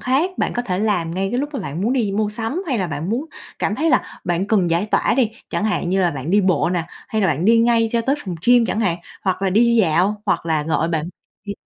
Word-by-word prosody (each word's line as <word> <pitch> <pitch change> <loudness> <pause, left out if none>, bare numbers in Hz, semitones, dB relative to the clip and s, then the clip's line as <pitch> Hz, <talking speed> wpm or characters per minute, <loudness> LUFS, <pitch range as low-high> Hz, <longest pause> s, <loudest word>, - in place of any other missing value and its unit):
khác 275 +9 +1
bạn - - 0
có 245 - -2
thể 185 -6 -2
làm 180 -6 0
ngay 190 +1 -1
cái 245 - -1
lúc 290 - -2
mà 270 - -3
bạn 150 -1 -5
muốn 230 - +1
đi 225 -7 0
mua 210 +1 0
sắm 225 - -3
hay 260 -7 0
là 185 - 0
bạn 160 +4 -4
muốn 255 +7 -1 0.3
cảm 205 - 0
thấy 320 +6 +1
là 255 - 0
bạn 180 +2 0
cần 195 -6 +2
giải 175 +5 +1
tỏa - - +1
đi, 245 -5 +2 0.2
chẳng - - -1
hạn 210 -5 -1
như 190 +1 +2
là 175 -2 +2
bạn 140 +2 -5
đi 205 +2 +4
bộ 185 -3 +2
nè, 175 -2 -1 0.2
hay 220 - -1
là - - +4
bạn 165 +3 0
đi 230 +2 +5
ngay 230 -1 +3
cho 235 - +2
tới 265 +4 +1
phòng 180 -3 -4
gym 245 -1 +5
chẳng 220 - -1
hạn, 180 -6 +1 0.3
hoặc 190 0 -1
là 195 - +1
đi 235 +4 +4
dạo 190 +4 +1
hoặc - - 0
là 155 -2 +1
gọi 160 +1 0
bạn 160 -2 -1 0.4
đi. 200 - -4
205 Hz, 280 wpm, -20 LUFS, 175-230 Hz, 0.4 s, đi